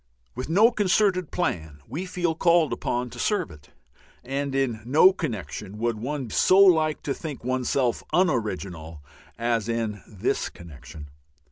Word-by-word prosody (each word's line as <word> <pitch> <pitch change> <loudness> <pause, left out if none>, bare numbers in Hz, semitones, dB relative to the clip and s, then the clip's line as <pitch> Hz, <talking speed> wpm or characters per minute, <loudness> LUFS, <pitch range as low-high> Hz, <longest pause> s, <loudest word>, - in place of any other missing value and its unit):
With 130 +4 -6
no 210 +8 +5
concerted 195 -4 +1
plan 80 - -3
we 180 +6 -5
feel 175 -2 -1
called 170 -1 +3
upon 120 0 -2
to - - -10
serve 205 - 0
it. 75 -2 -16 0.5
And 135 +2 -3
in 125 -5 0
no 155 - +5
connection 105 - -5
would 115 -1 -1
one 130 -1 -4
so 185 - +4
like 160 -6 +5
to 140 - -1
think 150 -3 -7
oneself 130 0 0
un 185 +1 +4
original 90 - -4 0.3
as 115 -2 -1
in 115 -3 -2
this 100 -4 -2
connection. 75 -2 -12
130 Hz, 145 wpm, -25 LUFS, 105-170 Hz, 0.5 s, no